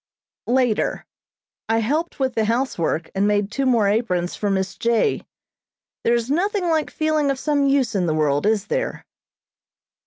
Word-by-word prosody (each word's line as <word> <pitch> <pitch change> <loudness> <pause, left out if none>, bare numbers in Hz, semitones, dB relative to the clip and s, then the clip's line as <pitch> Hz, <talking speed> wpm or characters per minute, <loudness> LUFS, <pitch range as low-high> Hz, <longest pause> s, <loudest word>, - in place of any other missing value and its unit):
Later. 245 -3 +1 0.6
I 225 - +3
helped 300 +10 -1
with 260 -1 0
the 220 -1 +1
housework 215 -9 -1
and 195 +1 +1
made 205 -1 +1
two 270 +3 -1
more 230 -5 +3
aprons 185 -5 0
for 205 - -2
Miss 190 -1 -1
J. 235 - +1 0.8
There 235 - +3
is 235 +2 -2
nothing 370 +3 0
like 315 -2 +1
feeling 310 -2 0
of 275 - 0
some 285 0 +1
use 275 -4 +2
in 185 -4 0
the 155 - 0
world, 150 +3 +1
is 215 -2 +1
there? - - -3
235 Hz, 160 wpm, -22 LUFS, 205-280 Hz, 0.8 s, I